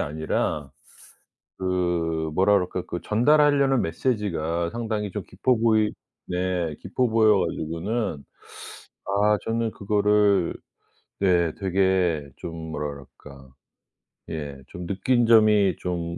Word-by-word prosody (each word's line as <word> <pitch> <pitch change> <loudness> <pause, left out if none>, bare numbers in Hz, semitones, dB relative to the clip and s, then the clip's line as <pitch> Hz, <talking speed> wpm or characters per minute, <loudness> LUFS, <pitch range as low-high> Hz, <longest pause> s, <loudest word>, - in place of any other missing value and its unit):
아니라 75 -1 -2 0.9
그 85 -4 -1
뭐라 95 +4 +4
그럴까 90 -2 0
그 85 - -5
전달하려는 140 +2 +3
메시지가 85 -5 -1
상당히 110 -2 -3
좀 105 +1 -5
깊어 120 +7 0
보이 110 -2 +2 0.3
네 90 -3 -2
깊어 125 +7 0
보여 110 -2 +4
가지고는 85 +1 -3 0.8
아 105 +1 +2
저는 115 0 -1
그거를 105 -2 +2 0.7
네. 85 -4 +2
되게 95 -5 +1
좀 80 - -7 0.2
뭐라 70 -3 -5
그럴까 70 -2 -14 0.8
예 75 -3 -5
좀 90 +2 -8
느낀 120 +6 +1
점이 105 -5 +5
좀 85 -1 -3
95 Hz, 215 characters per minute, -24 LUFS, 85-110 Hz, 0.9 s, 점이